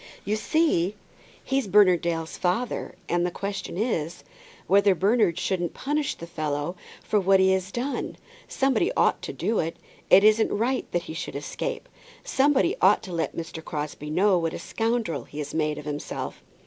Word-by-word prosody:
"You 205 Hz, +2 st, 0 dB
see 215 Hz, -, +1 dB, 0.5 s
he's 270 Hz, -3 st, 0 dB
Bernard 190 Hz, -3 st, +5 dB
Dale's 165 Hz, -1 st, -2 dB
father, 190 Hz, +7 st, -1 dB
and 175 Hz, 0 st, +1 dB
the 180 Hz, -, +1 dB
question 195 Hz, -1 st, -5 dB
is, 170 Hz, -, -2 dB, 0.4 s
whether 200 Hz, 0 st, +4 dB
Bernard 200 Hz, -2 st, +2 dB
shouldn't 175 Hz, -3 st, -1 dB
punish 295 Hz, +1 st, -1 dB
the 170 Hz, -, -8 dB
fellow 155 Hz, 0 st, -3 dB, 0.3 s
for 210 Hz, -, +1 dB
what 195 Hz, 0 st, +4 dB
he 190 Hz, 0 st, +5 dB
has 190 Hz, 0 st, 0 dB
done. 255 Hz, +6 st, -3 dB, 0.3 s
Somebody 270 Hz, -, +1 dB
ought -, -, +3 dB
to -, -, -5 dB
do 225 Hz, -, -1 dB
it. 165 Hz, 0 st, -2 dB, 0.3 s
It 195 Hz, -, +8 dB
isn't 215 Hz, +1 st, +4 dB
right 245 Hz, +5 st, -1 dB
that 175 Hz, -1 st, 0 dB
he 160 Hz, -, -7 dB
should 160 Hz, -, -5 dB
escape. 465 Hz, -, -4 dB, 0.4 s
Somebody 290 Hz, +7 st, +2 dB
ought -, -, +5 dB
to 185 Hz, -, -7 dB
let 165 Hz, -1 st, -2 dB
Mr. 165 Hz, -1 st, -6 dB
Crosbie 150 Hz, -2 st, -5 dB
know 185 Hz, +3 st, +3 dB
what 165 Hz, -1 st, -2 dB
a -, -, -3 dB
scoundrel 225 Hz, -9 st, -2 dB
he 145 Hz, -, -12 dB
has 150 Hz, -2 st, -4 dB
made 155 Hz, -1 st, 0 dB
himself." 150 Hz, 0 st, -5 dB
190 Hz, 170 wpm, -26 LUFS, 165-225 Hz, 0.5 s, It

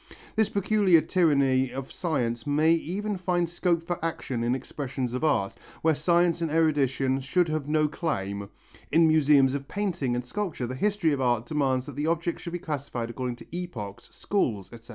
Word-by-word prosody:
This 220 Hz, -1 st, +2 dB
peculiar 200 Hz, -3 st, +4 dB
tyranny 140 Hz, -8 st, +2 dB
of 135 Hz, +1 st, -6 dB
science 120 Hz, -9 st, -2 dB
may 155 Hz, +3 st, +4 dB
even 195 Hz, +5 st, -2 dB
find 175 Hz, -1 st, 0 dB
scope 170 Hz, 0 st, 0 dB
for 175 Hz, -1 st, -4 dB
action 135 Hz, -7 st, -2 dB
in 120 Hz, +2 st, +1 dB
expressions 130 Hz, -2 st, -4 dB
of 125 Hz, -, -3 dB
art, 135 Hz, -11 st, +1 dB, 0.3 s
where 160 Hz, 0 st, +4 dB
science 170 Hz, +2 st, +2 dB
and 165 Hz, -, 0 dB
erudition 135 Hz, -4 st, +1 dB
should 170 Hz, +5 st, +1 dB
have 155 Hz, -2 st, -2 dB
no 155 Hz, 0 st, +3 dB
claim. 100 Hz, -, -3 dB, 0.4 s
In 165 Hz, 0 st, +5 dB
museums 145 Hz, -4 st, +5 dB
of 140 Hz, -1 st, -4 dB
painting 175 Hz, -12 st, -1 dB
and 125 Hz, 0 st, -3 dB
sculpture 175 Hz, -4 st, -3 dB
the 125 Hz, -, -4 dB
history 195 Hz, +2 st, +1 dB
of 135 Hz, -, -1 dB
art 120 Hz, -2 st, +1 dB
demands 130 Hz, -3 st, 0 dB
that 145 Hz, -, -9 dB
the 145 Hz, +2 st, -1 dB
objects 170 Hz, +1 st, -1 dB
should 170 Hz, -, -6 dB
be -, -, -1 dB
classified 140 Hz, -8 st, -4 dB
according 125 Hz, 0 st, -3 dB
to 140 Hz, -, -12 dB
epochs, 115 Hz, -, -6 dB
schools, 115 Hz, -, -2 dB
etc. 115 Hz, +1 st, -13 dB
150 Hz, 180 wpm, -27 LUFS, 130-170 Hz, 0.4 s, In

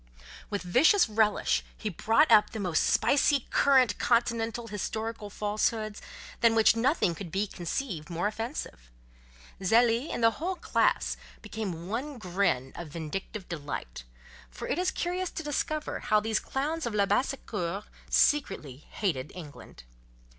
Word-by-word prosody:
With 205 Hz, -2 st, -3 dB
vicious 265 Hz, -, +5 dB
relish 215 Hz, -1 st, +2 dB
he 220 Hz, -, -5 dB
brought 225 Hz, -, +3 dB
up 210 Hz, -, +7 dB
the 220 Hz, -, -6 dB
most 180 Hz, -6 st, +1 dB
spicy 280 Hz, -1 st, +3 dB
current 260 Hz, -6 st, +4 dB
continental 230 Hz, -1 st, +1 dB
historical 220 Hz, 0 st, -4 dB
falsehoods—than 215 Hz, +2 st, -1 dB
which 225 Hz, 0 st, +5 dB
nothing 235 Hz, -, +2 dB
can 175 Hz, +1 st, -7 dB
be 195 Hz, +4 st, 0 dB
conceived 175 Hz, -, -4 dB
more 170 Hz, +2 st, -2 dB
offensive. 215 Hz, -, -4 dB, 0.7 s
Zélie, 230 Hz, -, +3 dB
and 235 Hz, -, -3 dB
the 225 Hz, -, +6 dB
whole 370 Hz, +3 st, -1 dB
class, -, -, +1 dB, 0.3 s
became 195 Hz, -6 st, -5 dB
one 260 Hz, +7 st, -4 dB
grin 175 Hz, -, 0 dB
of 170 Hz, -, -6 dB
vindictive 170 Hz, +6 st, -6 dB
delight; 145 Hz, -, -6 dB, 0.5 s
for -, -, -7 dB
it -, -, -1 dB
is 365 Hz, 0 st, +2 dB
curious 360 Hz, +1 st, -2 dB
to 320 Hz, -, -6 dB
discover 300 Hz, +1 st, -2 dB
how 215 Hz, -, +2 dB
these 220 Hz, +1 st, 0 dB
clowns 300 Hz, +2 st, -2 dB
of 225 Hz, -, -3 dB
Labassecour 205 Hz, -3 st, 0 dB, 0.3 s
secretly 195 Hz, -, +2 dB
hate 155 Hz, -10 st, -2 dB
England. 150 Hz, -, -11 dB
215 Hz, 130 wpm, -29 LUFS, 180-250 Hz, 0.7 s, up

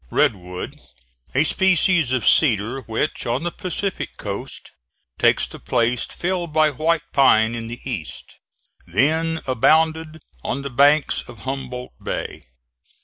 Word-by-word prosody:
Red -, -, +3 dB
wood, 90 Hz, -1 st, -8 dB, 0.5 s
a 140 Hz, -, +4 dB
species 180 Hz, -4 st, +3 dB
of 130 Hz, -2 st, 0 dB
cedar, 120 Hz, -2 st, +4 dB
which 110 Hz, 0 st, -2 dB
on 120 Hz, +6 st, -1 dB
the 175 Hz, -, -2 dB
Pacific 185 Hz, +2 st, -4 dB
coast -, -, -6 dB, 0.5 s
takes -, -, +3 dB
the -, -, -11 dB
place 120 Hz, 0 st, 0 dB
filled 175 Hz, -2 st, -3 dB
by 155 Hz, 0 st, +3 dB
white 160 Hz, +3 st, 0 dB
pine 110 Hz, -5 st, +4 dB
in 115 Hz, -1 st, -5 dB
the 120 Hz, +1 st, -7 dB
East, 80 Hz, -, -6 dB, 0.5 s
then 160 Hz, -, +1 dB
abounded 160 Hz, +5 st, +2 dB, 0.2 s
on 140 Hz, -, -3 dB
the 140 Hz, -, -5 dB
banks 145 Hz, +3 st, +3 dB
of 115 Hz, -4 st, -12 dB
Humboldt 130 Hz, -, -5 dB
Bay. -, -, -5 dB
135 Hz, 135 wpm, -21 LUFS, 120-160 Hz, 0.5 s, a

